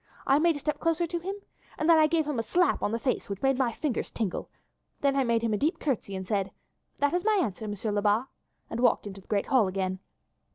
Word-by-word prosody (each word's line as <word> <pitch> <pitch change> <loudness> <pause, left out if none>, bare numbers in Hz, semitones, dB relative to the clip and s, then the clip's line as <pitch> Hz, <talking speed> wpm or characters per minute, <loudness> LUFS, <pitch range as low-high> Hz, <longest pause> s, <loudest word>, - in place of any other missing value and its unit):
I 275 +2 +4
made 335 0 +3
a - - -5
step 300 0 -2
closer 330 +1 +1
to 345 +1 -3
him, 385 +4 -4 0.4
and 310 - -1
then 330 -1 +7
I 310 - +6
gave 320 -1 +1
him 290 -5 -2
a - - +2
slap 355 +10 +2
on - - 0
the 230 - 0
face 255 -2 -2
which 200 +3 -5
made 270 -1 +2
my 250 -3 +2
fingers 265 +1 -2
tingle, 210 -6 -3 0.5
then 280 -1 +2
I 275 - +3
made 235 -2 +1
him 225 -2 +1
a - - +1
deep 305 - +1
curtsy 240 -9 -2
and 190 -1 -5
said, 200 -3 0 0.5
'That 285 +2 +1
is 355 0 +1
my 430 -1 +3
answer, 220 - -2
Monsieur 210 +1 -3
Lebat,' 205 +3 +2 0.4
and - - -5
walked 245 - +3
into 195 -1 -8
the - - -27
great 205 -2 0
hall 250 -7 +3
again. 185 0 -2
255 Hz, 250 wpm, -28 LUFS, 205-310 Hz, 0.5 s, then